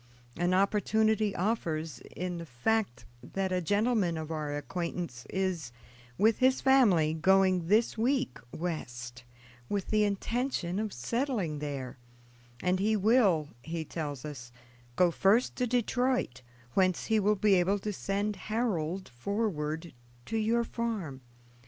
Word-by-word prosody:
An 175 +2 +1
opportunity 210 +2 +2
offers, 165 - -1 0.2
in 180 -1 -3
the 170 - -6
fact 150 - -1 0.2
that 190 -1 -3
a 180 0 +1
gentleman 205 -1 +1
of 160 0 -5
our 150 -2 -2
acquaintance 170 -4 -4
is, 185 -9 -2 0.5
with 220 +2 +3
his 260 0 +4
family, 205 - +4
going 185 +1 +3
this 220 +3 +2
week 250 - 0
West, 120 -8 -5 0.5
with 200 -2 -2
the 215 -1 +4
intention 205 -2 -1
of 215 -1 -2
settling 200 - -2
there, 140 -4 -5 0.6
and 180 +1 +2
he 215 +3 +2
will, 200 - +3
he 160 +2 -4
tells 145 -5 -5
us, 125 -5 -8 0.4
go 180 +3 +4
first 200 +8 +3
to 250 - +1
Detroit, 245 - 0 0.3
whence 185 -2 +2
he 220 -1 +2
will 210 +1 +3
be 205 0 +3
able 190 +2 +3
to 210 +1 -4
send 200 +2 -2
Harold 190 -6 -1
forward 160 - -3 0.3
to 225 - -4
your 225 +2 +2
farm. 215 - -4
190 Hz, 135 wpm, -30 LUFS, 160-220 Hz, 0.6 s, his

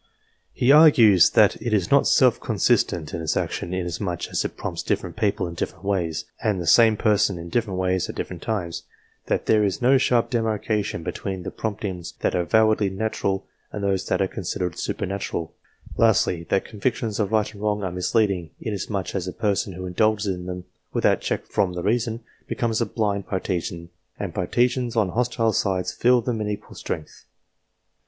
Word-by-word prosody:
He 125 - +3
argues 120 - +7
that - - +4
it 115 0 -2
is 95 -4 +1
not - - +5
self - - +4
consistent 80 -4 +1
in 85 - -3
its 80 - -1
action, 85 - -3
inasmuch 90 0 -3
as - - -1
it - - -5
prompts - - -4
different 85 -2 -2
people 100 -1 0
in 85 - -6
different 85 - -5
ways, 90 -5 -1 0.2
and 105 -4 +1
the 85 - -4
same 110 +6 +6
person 105 -4 +2
in 85 0 -8
different 105 -1 -1
ways 95 -1 0
at - - -6
different 90 -2 -5
times; 90 -7 -3 0.5
that - - 0
there 110 -1 +4
is 100 -2 0
no 130 +2 +4
sharp 120 -1 +2
demarcation 110 -5 -1
between 95 +2 -4
the - - -5
promptings 100 -5 -4
that - - +1
are 90 - +1
avowedly 110 +2 +3
natural, 95 -1 -2 0.3
and 105 - -5
those 95 -1 0
that 100 - +1
are - - 0
considered 90 -1 -3
super - - -3
natural; 95 -4 -4 0.4
lastly, 85 -1 +2
that 95 - +1
convictions 110 0 -2
of 105 -1 0
right 110 0 +1
and 100 - -12
wrong 105 -1 0
are 95 - -2
misleading, 90 -1 0
inasmuch 100 -2 -3
as 95 -2 -3
a - - -3
person 100 -1 -1
who 90 +1 -7
indulges 105 +2 +1
in 90 0 -7
them, 90 0 -6 0.3
without - - +2
check - - -2
from 90 -2 0
the 90 -1 -4
reason, 115 +1 0 0.3
becomes 115 -1 -1
a 115 - +1
blind 100 -2 -1
partisan, 85 -3 -3 0.3
and - - -4
partisans 120 +5 0
on 105 -5 +2
hostile 115 +1 0
sides 95 -2 0
feel 125 0 +3
them 115 -2 -2
in 105 - -2
equal 105 0 -6
strength. 80 - -6
100 Hz, 185 wpm, -24 LUFS, 90-110 Hz, 0.5 s, argues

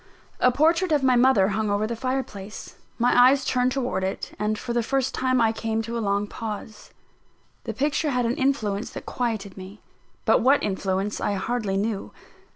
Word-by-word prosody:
A 250 - +4
portrait 330 +6 +2
of 295 -3 +2
my 255 -1 +4
mother 240 -6 +4
hung 215 +1 -1
over 205 +1 +1
the 230 +2 -3
fireplace: 230 -5 -5 0.2
my 245 +1 +2
eyes 270 0 +1
turned 250 0 +1
towards 250 -7 -1
it, 190 +1 -3
and 210 0 0
for 235 - -4
the 240 - +2
first 265 +2 -1
time 255 -1 +1
I 225 -1 +4
came 225 0 -2
to 230 +1 -5
a 230 - -1
long 200 -1 0
pause. 215 0 -7 0.8
The 225 - -3
picture 295 +4 0
had 250 -3 0
an 230 - +1
influence 230 -6 -1
that - - -7
quieted 220 -6 -3
me; 190 +2 -10 0.5
but - - +4
what 270 +4 +4
influence 195 +1 -2
I 205 - 0
hardly 205 -1 -1
knew. 205 0 -2
230 Hz, 185 wpm, -24 LUFS, 205-255 Hz, 0.8 s, A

